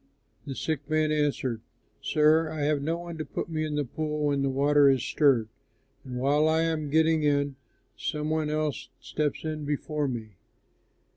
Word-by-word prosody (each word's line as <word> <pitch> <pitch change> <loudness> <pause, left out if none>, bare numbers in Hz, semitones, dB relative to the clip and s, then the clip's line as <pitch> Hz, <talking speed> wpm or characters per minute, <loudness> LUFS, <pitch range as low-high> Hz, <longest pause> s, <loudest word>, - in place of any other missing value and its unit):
The 135 - -4
sick 150 -1 -3
man 155 0 +2
answered, 140 -6 0 0.4
"Sir, 155 +1 +3
I 155 -1 -4
have 145 0 +1
no 165 +4 -1
one 170 -1 -8
to - - -1
put 145 - -5
me 155 -1 -2
in 155 -1 -2
the 145 -1 0
pool 150 +3 -2
when 140 -1 +1
the 135 - +1
water 140 +1 +4
is 135 -2 +2
stirred, 135 -7 +3 0.6
and 125 -1 -6
while 145 +4 +3
I 160 +1 +3
am 160 -3 -1
getting 160 +1 +3
in, 140 -1 +1 0.4
some 150 0 -3
one 155 -1 0
else 155 -2 -2
steps 150 -2 -2
in 155 -1 -3
before 150 0 -2
me." 110 -6 -6
150 Hz, 175 wpm, -27 LUFS, 140-155 Hz, 0.6 s, water